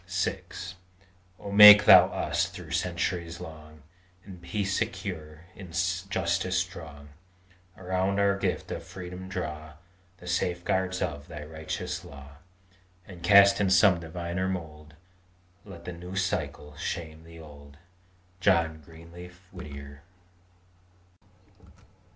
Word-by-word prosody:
VI 90 Hz, +1 st, -1 dB, 1.0 s
Oh 100 Hz, -, -8 dB
make 105 Hz, 0 st, +10 dB
Thou -, -, +9 dB
us, -, -, -1 dB
through -, -, -11 dB
centuries 85 Hz, -1 st, -2 dB
long, 75 Hz, -1 st, -12 dB, 0.4 s
In 95 Hz, -3 st, -11 dB
peace 100 Hz, +2 st, -2 dB
secure, 80 Hz, -5 st, -4 dB
in 95 Hz, -3 st, -11 dB
justice 95 Hz, 0 st, -1 dB
strong; 80 Hz, -5 st, -6 dB, 0.7 s
Around 95 Hz, +2 st, -1 dB
our 100 Hz, 0 st, +3 dB
gift 100 Hz, -, -3 dB
of -, -, -4 dB
freedom 90 Hz, 0 st, -9 dB
draw 75 Hz, -3 st, -6 dB, 0.4 s
The 90 Hz, -, -15 dB
safeguards 90 Hz, +1 st, -1 dB
of 75 Hz, -1 st, -5 dB
Thy 75 Hz, 0 st, -8 dB
righteous 80 Hz, +1 st, -5 dB
law: 70 Hz, 0 st, -13 dB, 0.7 s
And, 90 Hz, -3 st, -12 dB
cast 100 Hz, +1 st, +6 dB
in 100 Hz, -, +2 dB
some 95 Hz, -1 st, +5 dB
diviner 85 Hz, +2 st, -4 dB
mould, 75 Hz, -5 st, -7 dB, 0.7 s
Let 85 Hz, -4 st, -12 dB
the 90 Hz, -, -6 dB
new 90 Hz, +2 st, -9 dB
cycle 90 Hz, -5 st, -3 dB
shame 80 Hz, 0 st, -5 dB
the 85 Hz, 0 st, -14 dB
old! 70 Hz, -2 st, -14 dB, 0.6 s
JOHN 85 Hz, -5 st, +2 dB
GREENLEAF 85 Hz, +3 st, -13 dB
WHITTIER. 70 Hz, -5 st, -10 dB
85 Hz, 115 wpm, -27 LUFS, 80-95 Hz, 1.0 s, make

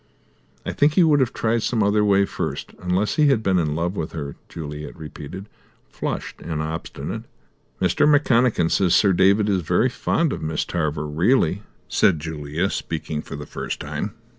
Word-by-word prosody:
"I -, -, -2 dB
think 145 Hz, +1 st, +3 dB
he 180 Hz, -, +6 dB
would 150 Hz, -3 st, +4 dB
have 130 Hz, -3 st, +2 dB
tried 115 Hz, +1 st, 0 dB
some 110 Hz, -1 st, +1 dB
other 105 Hz, +1 st, +3 dB
way 100 Hz, -1 st, +4 dB
first, -, -, -4 dB
unless 90 Hz, +3 st, 0 dB
he 150 Hz, -1 st, +5 dB
had 130 Hz, -6 st, +3 dB
been 95 Hz, -2 st, +2 dB
in 75 Hz, -3 st, 0 dB
love 85 Hz, +4 st, -1 dB
with 80 Hz, -4 st, -4 dB
her," 70 Hz, -3 st, -5 dB
Juliet 75 Hz, -2 st, -7 dB
repeated, 80 Hz, +5 st, -8 dB, 0.4 s
flushed -, -, -4 dB
and 80 Hz, -2 st, -4 dB
obstinate. 80 Hz, +2 st, -5 dB, 0.5 s
"Mr. -, -, +3 dB
McConachan 125 Hz, -, +3 dB
says 90 Hz, -2 st, +3 dB
Sir 100 Hz, +1 st, +4 dB
David 100 Hz, +3 st, +4 dB
is 95 Hz, -3 st, +1 dB
very 90 Hz, +10 st, +2 dB
fond 155 Hz, +4 st, 0 dB
of -, -, -5 dB
Miss 80 Hz, 0 st, -1 dB
Tarver, 75 Hz, -3 st, -2 dB
really," 90 Hz, -, +2 dB, 0.3 s
said 85 Hz, -6 st, +3 dB
Julia, 80 Hz, +3 st, -2 dB
speaking 75 Hz, -1 st, -3 dB
for -, -, -8 dB
the 75 Hz, +1 st, -7 dB
first -, -, -5 dB
time. 75 Hz, +9 st, -4 dB
90 Hz, 175 wpm, -23 LUFS, 80-110 Hz, 0.5 s, he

